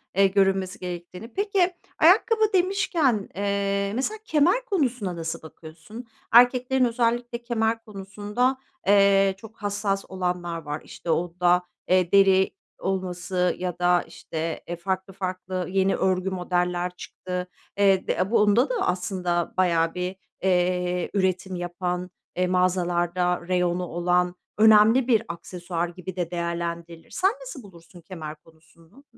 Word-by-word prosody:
eee, 195 0 +5
görünmesi 190 -1 +1
gerektiğini 180 +5 -7
Peki 390 -3 +1 0.3
ayakkabı 435 +5 +4
demişken, 350 - +1
eee, 200 0 0
mesela 345 - -1
kemer 360 +12 +2
konusuna 250 - -1
nasıl 165 -1 -4
bakıyorsun? 160 +9 -11 0.2
Erkeklerin 250 +2 +5
özellikle 235 0 -1
kemer 225 -1 -1
konusunda, 210 +5 -2 0.3
eee, 195 -1 +5
çok 220 +2 -13
hassas 200 -1 -2
olanlar 180 -2 -3
var 150 0 -5
işte, 170 - -9
onda 175 +1 +2 0.3
deri 190 +1 +4 0.3
olması 180 -1 -1
ya 180 -1 -4
da 175 0 +3
işte, 160 0 -5
eee, 175 - -3
farklı 190 +2 -3
farklı 185 -1 -4
yeni 195 0 +2
örgü 185 0 0
modeller 180 -1 -1
çıktı. 180 0 -6 0.3
Eee, 195 -2 +3
de 190 +4 0
bunda 210 - +4
da - - -1
aslında 180 -2 -1
bayağı 165 -3 +2
bir, 180 +1 -3 0.3
eee, 180 -1 +1
üretim 190 -1 0
yapan, 180 +1 -3 0.3
eee, 180 0 +1
mağazalarda 180 -1 +1
reyonu 180 -1 +1
olan, 180 +1 +1 0.2
önemli 220 +3 +6
bir 225 -3 +3
aksesuar 175 0 -4
gibi 180 +1 -8
de 175 -1 -3
değerlendirilir. 170 -1 -4
Sen 385 +2 +2
nasıl 400 - -8
bulursun 175 -2 -15
kemer 160 -3 -8
konusunu? 165 - -22
185 Hz, 125 wpm, -25 LUFS, 175-215 Hz, 0.3 s, önemli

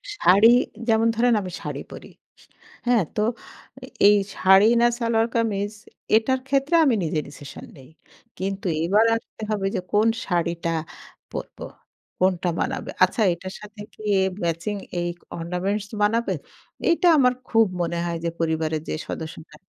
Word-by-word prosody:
শাড়ি 205 - +6 0.4
যেমন 225 0 +3
ধরেন 240 +2 +3
আমি 185 - -6
শাড়ি - - -5
পড়ি। - - -10 0.8
হ্যাঁ? 240 -4 +4
তো - - 0 0.9
এই 205 - +7 0.2
শাড়ি 190 +2 +6
না 240 - +6
সালোয়ার 230 -1 +1
কামিজ 205 -3 0 0.5
এটার 260 +4 0
ক্ষেত্রে 275 +4 +1
আমি 260 -5 +3
নিজে 155 -1 -1
ডিসিশন 145 -1 -11
নেই। 130 -1 -15 0.5
কিন্তু 195 0 -3 0.2
এবার 205 +6 +4
আসতে 225 -1 -8
হবে 200 -2 0
যে 185 - -1
কোন 210 +2 +4 0.2
শাড়িটা 170 -2 -1 0.6
পরবো, - - -7 0.5
কোনটা 185 -1 +1
মানাবে। - - -3
আচ্ছা 185 +5 +2
এটার 185 +3 -8
সাথে 210 0 -11
কি - - -16 0.4
ম্যাচিং 170 +5 -2 0.3
এই 175 - -1 0.3
অর্নামেন্টস 185 +5 -2 0.2
মানাবে? 230 +3 +1 0.5
এইটা 340 +1 +3
আমার 250 -3 +4 0.2
খুব 225 -1 +5 0.2
মনে 170 0 -2
হয় 170 -1 -2
যে 170 - +1
পরিবারের 160 -1 -1
যে - - -1
সদস্যরা 160 -1 -7
200 Hz, 140 wpm, -23 LUFS, 170-225 Hz, 0.9 s, এই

